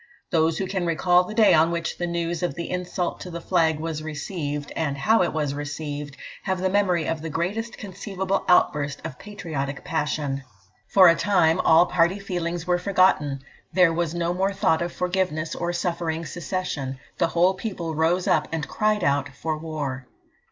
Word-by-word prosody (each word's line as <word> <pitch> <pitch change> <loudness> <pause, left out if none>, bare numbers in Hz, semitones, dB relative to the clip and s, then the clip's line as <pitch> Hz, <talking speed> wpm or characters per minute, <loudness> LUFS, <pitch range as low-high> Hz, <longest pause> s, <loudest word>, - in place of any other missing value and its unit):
Those 160 -2 +2
who 195 - -1
can 185 -2 -2
recall 180 +2 +3
the 215 - -7
day 220 -2 +6
on 160 +1 +5
which 170 -1 -3
the 175 - -1
news 170 -1 -2
of 175 - -1
the 170 -1 -5
insult 180 -1 -2
to 180 - -7
the 170 -1 -5
flag 165 -3 +1
was 160 -1 -3
received, 150 -1 -4
and 140 -4 -1
how 220 +10 +3
it 175 - +1
was 150 -3 -1
received, 145 -1 -5 0.2
have 190 -2 -2
the 185 0 0
memory 185 -5 +2
of 165 -1 -2
the 160 - -4
greatest 200 +9 -3
conceivable 195 0 -3
outburst 145 -5 +3
of 125 - -7
patriotic 160 -10 -5
passion. 150 -3 -1 0.5
For 190 -2 +7
a 165 - +8
time, 175 -4 +3
all 165 -1 +6
party 175 +2 +2
feelings 175 -4 -3
were 180 0 +2
forgotten; 180 -7 +2 0.3
there 180 -2 +5
was 170 -1 -1
no 170 0 0
more 190 +2 0
thought 165 -4 +2
of 170 0 -2
forgiveness, 180 -4 -1
or 175 0 -2
suffering 170 -2 -2
secession; 160 -7 -4 0.2
the - - +3
whole 175 +3 +3
people 185 -5 -4
rose 165 +4 +1
up 150 - +2
and 160 -3 -2
cried 215 +2 +1
out 140 -1 +1
for 160 -1 -2
war. 145 -5 -5
170 Hz, 180 wpm, -24 LUFS, 155-185 Hz, 0.5 s, a